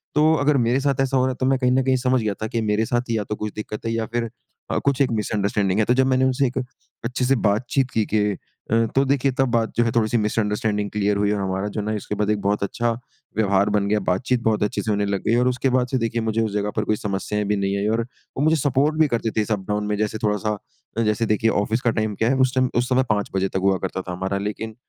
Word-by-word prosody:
तो 155 +2 +5
अगर 145 -1 +2
मेरे 125 +3 +2
साथ 140 -1 +1
ऐसा 135 0 +1
हो 130 - +3
रहा 130 - +1
है, - - -5
तो 130 - +1
मैं 135 0 +3
कहीं 125 -1 +2
न 130 +1 +3
कहीं 130 0 +2
समझ 125 -1 +1
गया 105 -2 -1
था - - -1
कि 115 +1 -2
मेरे 105 +1 +1
साथ 120 +1 -1
ही 115 - +1
या 105 - -1
तो 105 - -1
कुछ 105 0 -5
दिक्क़त 105 +1 -6
है 115 - 0
या 115 -1 -1
फिर 115 -1 -1 0.4
अ, - - +1
कुछ 140 0 +2
एक 130 - +3
मिसंडरस्टैंडिंग 105 -2 0
है। 110 - +3
तो 125 - +3
जब 130 +1 +3
मैंने 130 0 +3
उनसे 130 +1 +2
एक 125 - -5 0.5
अच्छे 125 +1 -1
से 135 +1 +3
बातचीत 125 +5 0
की 110 -2 +1
कि 110 - +4 0.5
अ, 115 0 +4
तो 135 - +5
देखिए, 135 0 +2
तब 135 +1 +1
बात 115 -2 +1
जो 120 - +4
है 115 - +1
थोड़ी-सी 115 +1 +2
मिसंडरस्टैंडिंग 105 -1 0
क्लियर 105 -1 +1
हुई, 105 0 +1
और 105 -1 -1
हमारा 95 +1 -2
जो 105 - -4
है - - -5
ना 110 - -1
उसके 105 0 -4
बाद 105 0 0
एक 105 -1 +1
बहुत 100 +1 0
अच्छा 115 +4 0 0.5
व्यवहार 100 -1 +3
बन 100 -1 +1
गया, 105 +1 +2
बातचीत 120 +7 0
बहुत 110 -2 +2
अच्छे 105 - -1
से 110 - -2
होने 100 0 +1
लग 100 -1 -2
गई, 115 - +3
और 125 +1 +3
उसके 125 +1 +1
बाद 125 0 +2
से 130 - +2
देखिए 115 0 -1
मुझे 110 0 0
उस 110 -2 -1
जगह 105 0 -1
पर 105 - +2
कोई 110 - +1
समस्याएँ 105 +1 -2
भी 105 +1 +1
नहीं 100 0 0
आई। 100 +1 0
और - - +1 0.4
वो 140 - +1
मुझे 160 +1 +4
सपोर्ट 145 +1 +1
भी 155 - +5
करते 115 -3 -1
थे - - +4
इस 105 - -3
अप-डाउन 105 +1 -1
में, 105 - 0
जैसे 110 0 -1
थोड़ा-सा 105 0 0 0.4
अ, - - +2
जैसे 105 +1 +1
देखिए 110 +1 +2
ऑफिस 110 +4 -1
का 120 - +2
टाइम 110 -2 -1
क्या 115 +4 +1
है, 135 - +2
उस 130 0 +2
टाइम 130 -1 +2
उस 120 +2 +1
समय 130 +1 +3
5 105 -2 0
बजे 95 0 +1
तक - - -2
हुआ 95 - +2
करता 95 0 -3
था 90 - -7
हमारा, 95 +2 -2
लेकिन 110 +1 -6
110 Hz, 285 wpm, -22 LUFS, 105-125 Hz, 0.5 s, तो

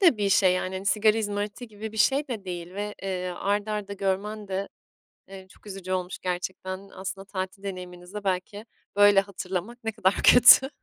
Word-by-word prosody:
de 345 - +6
bir 205 -1 0
şey, 190 -1 +5
yani. 185 +1 -2
Hani, 190 +1 -5
sigara 215 +2 +3
izmariti 205 +3 -3
gibi 215 +1 -8
bir 220 - -10
şey 270 +7 +2
de 220 -5 -5
değil 175 0 -6
ve, 205 +1 -4
eee, 185 -1 -3
art 205 +2 0
arda 210 -1 -3
görmen 200 +2 -2
de, 195 +1 -3 0.6
eee, 190 -1 -11
çok - - -19
üzücü 190 -2 -7
olmuş 185 0 -2
gerçekten. 185 +2 -4
Aslında 195 +1 -7
tatil 190 0 -5
deneyiminizi 180 -1 -8
de 210 -1 -6
belki 195 +3 -2 0.3
böyle 205 -1 +7
hatırlamak 195 +4 -5
ne 225 - -1
kadar 200 -3 +1
kötü. 250 +2 +8
195 Hz, 185 wpm, -26 LUFS, 185-210 Hz, 0.6 s, kötü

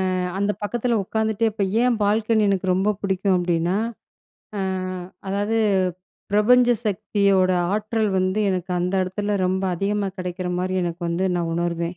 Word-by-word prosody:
அ - - 0 0.2
அந்த 200 +1 +1
பக்கத்தில 235 +2 0
உக்காந்துட்டே 220 +2 0
இப்போ 205 -2 -1 0.2
ஏன் 245 -2 +2
பால்கனி 215 +1 +2
எனக்கு 190 -1 0
ரொம்ப 200 +3 +1
புடிக்கும்? 190 -1 +1
அப்படின்னா 175 +1 0 0.8
அ - - -1 0.7
அதாவது 205 +3 0 0.7
பிரபஞ்ச 245 +4 +5 0.2
சக்தியோட 200 -2 +2 0.2
ஆற்றல் 215 +1 0
வந்து 185 +3 +1
எனக்கு 185 -1 -3
அந்த 180 +2 -1
எடத்துல 205 +3 -2
ரொம்ப 190 +1 0
அதிகமா 200 +2 -1
கெடைக்கிற 180 0 -4
மாரி 185 +1 -2
எனக்கு 170 +1 -4
வந்து 180 +3 0
நான் 170 -1 -1
உணருவேன். 170 0 -2
195 Hz, 140 wpm, -23 LUFS, 185-215 Hz, 0.8 s, பிரபஞ்ச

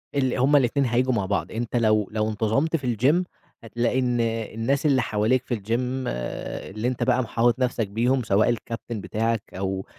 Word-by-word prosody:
اللي 130 -3 +1
هُم 135 +4 +3
الاتنين 135 0 +3
هييجوا 125 +2 +1
مع 105 -5 0
بعض، 100 +2 -2
أنت 115 +2 -4
لو 110 -3 +2
لو 110 0 0
انتظمت 110 +9 0
في 125 -6 -1
الGym، 150 - +3 0.4
هتلاقي 120 +3 0
إن 125 -1 0
الناس 115 +5 -1
اللي 135 -3 +4
حواليك 110 +3 +1
في 120 - -1
الGym 125 +5 -2
آآ، - - -5
اللي 110 +5 -3
أنت 125 -1 -1
بقى 130 +1 +2
محاوط 115 +2 +1
نفْسك 120 -4 0
بيهم 120 +5 +1
سواء 110 +3 +3
الكابتن 115 -1 -4
بتاعك 115 +1 -1
أو 95 0 -3
120 Hz, 180 wpm, -24 LUFS, 110-130 Hz, 0.4 s, اللي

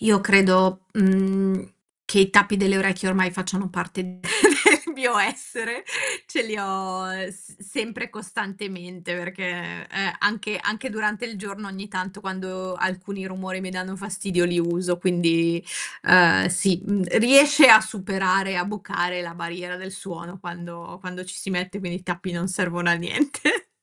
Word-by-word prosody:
Io 215 -2 +4
credo, 185 -2 +5
mhmm, 190 -1 +1 0.3
che 200 - +3
i 195 0 +5
tappi 205 +1 +5
delle 195 -1 +2
orecchie 190 -1 0
ormai 185 -1 +1
facciano 185 +1 -3
parte 185 +1 -5
del 180 0 -11 0.7
mio 245 -5 +1
essere, 230 +3 -2 0.4
ce - - -1
li 215 -1 -5
ho 190 -1 -4 0.2
s 190 -1 -15
sempre 230 +3 -6
costantemente 190 -4 -7
perché, 175 0 -6
eh, 195 -3 -2
anche 210 0 -1
anche 220 +6 -3
durante 210 0 -2
il 230 -4 -6
giorno 200 +1 -9
ogni 195 +1 -9
tanto 190 0 -6
quando 185 -1 -6
alcuni 190 +2 -4
rumori 185 0 -6
mi 185 - -6
danno 185 +1 -6
fastidio 195 -2 -2
li 175 0 0
uso, 175 +1 -1
quindi, 170 -1 +1 0.4
uhm, 170 - +6
sì, 180 0 +1
mhmm, 205 -2 0
riesce 275 +5 +7
a 220 -2 +11
superare, 195 -3 -1
a 175 - 0
bucare 180 -3 -3
la 170 -1 -8
barriera 180 +1 -7
del 190 +1 -9
suono 175 -1 -9
quando 175 -1 -10
quando 180 -1 -8
ci 185 0 -9
si 195 - -7
mette, 185 +1 -3
quindi 180 -2 -5
i - - -20
tappi 180 0 -5
non 175 +2 -3
servono 175 -2 -1
a - - +6
niente. 175 - 0
190 Hz, 155 wpm, -23 LUFS, 180-200 Hz, 0.7 s, a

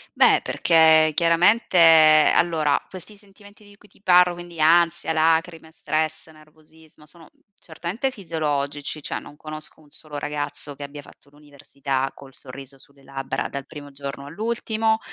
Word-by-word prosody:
Beh, - - +4
perché 160 -1 +4
chiaramente 175 +5 +2 0.6
allora 155 -4 +2
questi 190 +3 -11
sentimenti 205 +1 -19
di 205 0 -18
cui 210 - -21
ti 195 - -27
parlo, 180 -2 +4
quindi 175 -1 -11
ansia, 165 +1 +2
lacrime, 160 0 0
stress, 155 0 -3
nervosismo 155 0 -21
sono 160 +1 -17 0.3
certamente 180 +11 -5
fisiologici, 150 - -3
cioè - - -4
non 145 - -15
conosco 155 0 -9
un 150 - -22
solo 150 -2 -10
ragazzo 145 0 -5
che 145 - -9
abbia 145 +1 -9
fatto 140 - -20
l'università 140 -2 -5
col 135 -1 -15
sorriso 135 +1 -11
sulle 140 0 -20
labbra 135 0 -5
dal 140 -1 -7
primo 145 -1 -11
giorno 140 0 -8
all'ultimo. 220 +5 -2
155 Hz, 145 wpm, -22 LUFS, 145-175 Hz, 0.6 s, Beh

